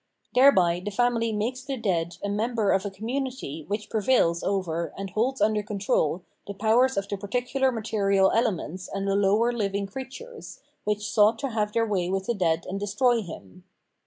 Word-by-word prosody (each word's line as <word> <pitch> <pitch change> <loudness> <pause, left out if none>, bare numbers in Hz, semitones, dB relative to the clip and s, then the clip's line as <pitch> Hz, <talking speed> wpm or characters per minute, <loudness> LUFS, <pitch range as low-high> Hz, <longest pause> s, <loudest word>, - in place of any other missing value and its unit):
Thereby 185 -10 +5
the 210 - -2
family 230 +1 +1
makes 230 +5 -2
the 270 0 -4
dead 170 -6 -1
a - - -1
member 215 0 0
of 195 +1 +1
a - - -3
community 230 - -4
f 150 - -17
which 210 +1 -3
prevails 205 -6 +2
over 170 -4 -1
and 195 -1 -5
holds 245 +6 0
under 210 0 +2
control 195 -5 0 0.2
the 200 - -6
powers 230 +5 +3
of 195 0 -1
the 200 - -3
particular 245 +6 0
material 200 -4 +2
elements 185 -6 -1
and 195 0 -3
the 195 - +1
lower 205 +4 +3
hviag 200 -3 -2
creatures, 270 - -9 0.3
which 210 0 -1
sought 215 +1 +4
to 275 - -3
have 210 -2 -1
their 230 0 +2
way 190 -5 -1
with 190 0 -1
the 235 - 0
dead 170 -5 0
and 195 +1 -3
destroy 230 +4 +2
him. 95 - -11
210 Hz, 185 wpm, -26 LUFS, 195-235 Hz, 0.3 s, Thereby